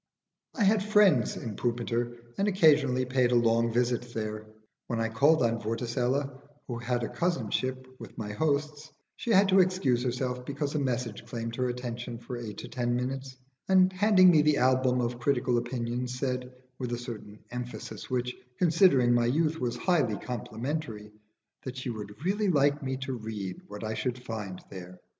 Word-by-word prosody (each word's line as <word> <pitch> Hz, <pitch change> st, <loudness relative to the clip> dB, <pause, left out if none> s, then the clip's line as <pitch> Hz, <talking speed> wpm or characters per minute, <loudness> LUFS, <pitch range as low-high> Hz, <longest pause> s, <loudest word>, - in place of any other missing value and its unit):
I 230 Hz, -, +1 dB
had 205 Hz, 0 st, +4 dB
friends 205 Hz, -, +4 dB
in 110 Hz, -3 st, -5 dB
Pumpiter 120 Hz, 0 st, -2 dB
and 200 Hz, -, +2 dB
occasionally 145 Hz, -9 st, +4 dB
paid 125 Hz, -1 st, +2 dB
a -, -, +3 dB
long 115 Hz, 0 st, +3 dB
visit 120 Hz, 0 st, 0 dB
there. 110 Hz, -1 st, -4 dB, 0.4 s
When 115 Hz, -, -2 dB
I 115 Hz, 0 st, 0 dB
called 140 Hz, +6 st, +4 dB
on 115 Hz, 0 st, +1 dB
Vorticella, 125 Hz, +4 st, -1 dB, 0.2 s
who 120 Hz, -2 st, -5 dB
had 120 Hz, 0 st, -1 dB
a -, -, -1 dB
cousinship 130 Hz, -, -1 dB
with 115 Hz, -4 st, -11 dB
my 105 Hz, -1 st, -4 dB
hosts, 150 Hz, +3 st, -1 dB, 0.2 s
she -, -, -6 dB
had 200 Hz, -2 st, +6 dB
to 190 Hz, 0 st, +6 dB
excuse 180 Hz, -10 st, +2 dB
herself 125 Hz, 0 st, -2 dB
because 140 Hz, +2 st, -3 dB
a 150 Hz, -, 0 dB
message 125 Hz, -5 st, -2 dB
claimed 115 Hz, -1 st, -4 dB
her 125 Hz, 0 st, 0 dB
attention 120 Hz, -1 st, -5 dB
for 120 Hz, +2 st, -7 dB
eight 115 Hz, -3 st, -6 dB
or -, -, -7 dB
ten 120 Hz, -1 st, -1 dB
minutes, 130 Hz, +1 st, -4 dB, 0.3 s
and 190 Hz, 0 st, +5 dB
handing 185 Hz, -1 st, +6 dB
me 155 Hz, -3 st, +5 dB
the 150 Hz, -1 st, +3 dB
album 130 Hz, 0 st, +3 dB
of 120 Hz, 0 st, -2 dB
critical 125 Hz, -2 st, +1 dB
opinions 120 Hz, +1 st, -3 dB
said, 125 Hz, -1 st, -2 dB, 0.3 s
with 125 Hz, -2 st, -3 dB
a -, -, -1 dB
certain 115 Hz, -4 st, -8 dB
emphasis 125 Hz, 0 st, -6 dB
which, 125 Hz, -1 st, -1 dB, 0.2 s
considering 160 Hz, -8 st, +4 dB
my 120 Hz, -1 st, +3 dB
youth, 155 Hz, +5 st, +1 dB
was 120 Hz, -2 st, -2 dB
highly 150 Hz, -, +1 dB
complimentary, 120 Hz, -1 st, -5 dB, 0.5 s
that 130 Hz, 0 st, -6 dB
she 130 Hz, -1 st, -3 dB
would 105 Hz, +5 st, -8 dB
really 205 Hz, +2 st, +1 dB
like 145 Hz, -3 st, +3 dB
me 130 Hz, -1 st, -2 dB
to 135 Hz, 0 st, -4 dB
read 105 Hz, -5 st, -5 dB
what 105 Hz, +1 st, -8 dB
I 110 Hz, 0 st, -2 dB
should 125 Hz, +2 st, -2 dB
find 110 Hz, -6 st, -6 dB
there. 90 Hz, -1 st, -9 dB
125 Hz, 175 wpm, -29 LUFS, 115-145 Hz, 0.5 s, had